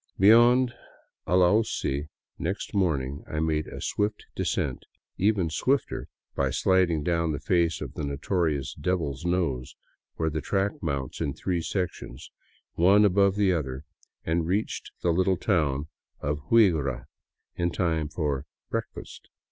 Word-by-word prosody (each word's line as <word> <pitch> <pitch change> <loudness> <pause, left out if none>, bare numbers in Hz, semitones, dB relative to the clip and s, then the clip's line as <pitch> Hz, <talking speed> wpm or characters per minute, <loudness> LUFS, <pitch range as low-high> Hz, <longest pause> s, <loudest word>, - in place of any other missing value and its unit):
Beyond 120 +5 +6 0.5
Alausi 90 -6 +2 0.3
next 95 +6 -3
morning 70 -8 0
I 75 - -2
made 80 -1 0
a - - -8
swift 105 0 -2
descent, - - -1 0.4
even 95 -5 +2
swifter 135 - 0 0.3
by - - 0
sliding 90 -5 +2
down 85 -1 +1
the 70 - -3
face 85 0 +1
of - - -6
the - - -5
notorious 70 0 -1
" - - -12
Devil's 85 -5 -1
Nose," 80 -8 -1 0.4
where 80 -1 -1
the 80 0 -2
track 100 +4 0
mounts 70 -5 -3
in 75 -4 -1
three 90 0 -1
sections, 80 -8 -4 0.4
one 100 +5 +5
above 100 0 +3
the 100 -3 +3
other, 65 -4 -3 0.4
and 80 0 0
reached 100 +5 -1
the 85 - +3
little 95 +1 +2
town 75 -8 0 0.3
of 75 +1 -2
Huigra 75 - +3 0.5
in 85 0 0
time 80 -4 -1
for 75 -3 -2
" - - -63
breakfast." - - -6
85 Hz, 140 wpm, -27 LUFS, 75-95 Hz, 0.5 s, Beyond